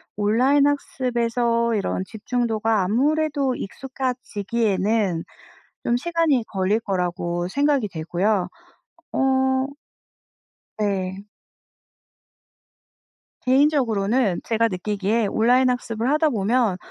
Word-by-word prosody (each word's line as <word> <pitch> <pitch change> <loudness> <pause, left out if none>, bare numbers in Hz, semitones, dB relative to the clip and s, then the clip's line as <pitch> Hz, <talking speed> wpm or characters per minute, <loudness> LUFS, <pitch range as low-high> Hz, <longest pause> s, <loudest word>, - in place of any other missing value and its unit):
온라인 255 +8 +3
학습에서 235 -4 0
이런 195 -2 -1
집중도가 220 -1 -1
아무래도 280 +4 +1
익숙해지기에는 220 -6 -2 0.6
좀 240 - +2
시간이 325 -6 +1
걸릴 195 +3 0
거라고 175 -3 -2
생각이 280 -1 +1
되고요. 180 +4 0 0.7
어. 265 0 +2 1.1
네. 195 -2 -2 2.2
개인적으로는 250 - +2
제가 230 0 +1
느끼기에 205 +2 -1
온라인 250 +5 +3
학습을 240 -1 -2
하다 310 +1 +3
보면 220 -3 +1
230 Hz, 225 characters per minute, -23 LUFS, 200-260 Hz, 2.2 s, 온라인